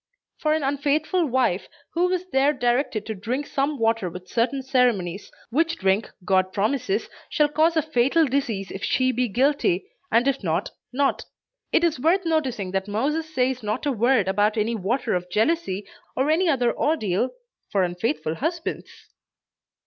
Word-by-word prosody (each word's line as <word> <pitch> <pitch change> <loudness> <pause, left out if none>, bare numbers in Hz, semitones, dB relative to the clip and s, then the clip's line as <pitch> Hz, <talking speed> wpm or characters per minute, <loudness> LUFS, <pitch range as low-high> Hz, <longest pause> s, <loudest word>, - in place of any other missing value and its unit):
for 305 0 +2
an 315 - -1
unfaithful 295 +5 +1
wife, 235 -8 +1 0.3
who 355 +2 +2
is 365 0 -1
there 275 +2 +3
directed 240 -4 0
to 220 - -3
drink 240 +8 -3
some 280 +2 -1
water 225 -5 +1
with 180 +2 -10
certain 245 +6 0
ceremonies, 230 -9 0 0.2
which 330 +6 +1
drink 195 +2 +1 0.2
God 185 0 +2
promises 260 - 0 0.2
shall 300 -4 +3
cause 315 +3 +2
a 315 - +3
fatal 310 +2 +3
disease 245 -8 -2
if 195 - -7
she 255 0 +2
be 250 0 0
guilty, 245 -5 +1 0.3
and 235 +4 +3
if 275 -4 0
not, 170 +3 -1 0.2
not. 275 +2 0 0.5
It 330 - +3
is 330 -6 +1
worth 345 +7 +2
noticing 260 - -1
that 190 +1 -1
Moses 300 +10 -1
says 255 -2 0
not 215 +6 -3
a 290 - +2
word 235 -3 +2
about 205 +3 +2
any 220 +2 +1
"water 230 +4 -1
of 180 0 -2
jealousy," 210 - 0 0.3
or 270 +4 +2
any 340 +2 +3
other 245 -5 +2
ordeal, 245 - 0 0.4
for 195 -2 +2
unfaithful 180 - -1
husbands! 325 - -3
250 Hz, 165 wpm, -24 LUFS, 205-295 Hz, 0.5 s, there